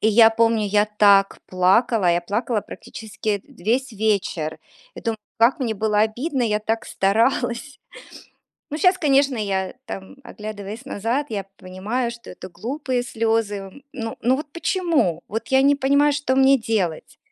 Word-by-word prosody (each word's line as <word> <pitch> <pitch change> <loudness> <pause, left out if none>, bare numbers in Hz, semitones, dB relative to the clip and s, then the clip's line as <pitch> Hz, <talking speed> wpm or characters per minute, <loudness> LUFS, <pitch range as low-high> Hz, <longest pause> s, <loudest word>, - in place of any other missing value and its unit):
И 220 - +3
я 225 +1 +7
помню, 225 -1 +2
я 205 +1 +2
так 200 -2 +4
плакала, 190 +2 +3
я 170 0 +2
плакала 210 +5 -1
практически, 220 0 -9
э, - - -20
весь 250 0 -2
вечер, 200 -7 -1 0.4
и - - -7
думаю, 225 -1 -2 0.2
как 245 +7 +4
мне 230 -4 -1
было 210 0 0
обидно, 250 +6 0
я 210 -3 +1
так 225 +1 -2
старалась. 235 +6 0 0.9
Ну, 300 - -3
щас, 365 0 +4
конечно, 275 -3 +3
я, 195 -3 -2
там, 195 +2 -8
оглядываясь 215 0 -8
назад, 250 +4 -2
я 200 -3 -4
понимаю, 205 +7 -3
что 235 0 -12
это 185 - -10
глупые 250 - -3
слёзы. 225 -2 -2
Ну 225 -3 -5
ну, 255 +2 +2
вот 295 - -5
почему? 320 - 0
Вот 225 +2 -4
я 265 +1 +4
не 285 +1 +5
понимаю, 280 +2 +3
что 285 -2 -1
мне 270 0 +5
делать. 205 -8 -2
225 Hz, 155 wpm, -22 LUFS, 205-260 Hz, 0.9 s, я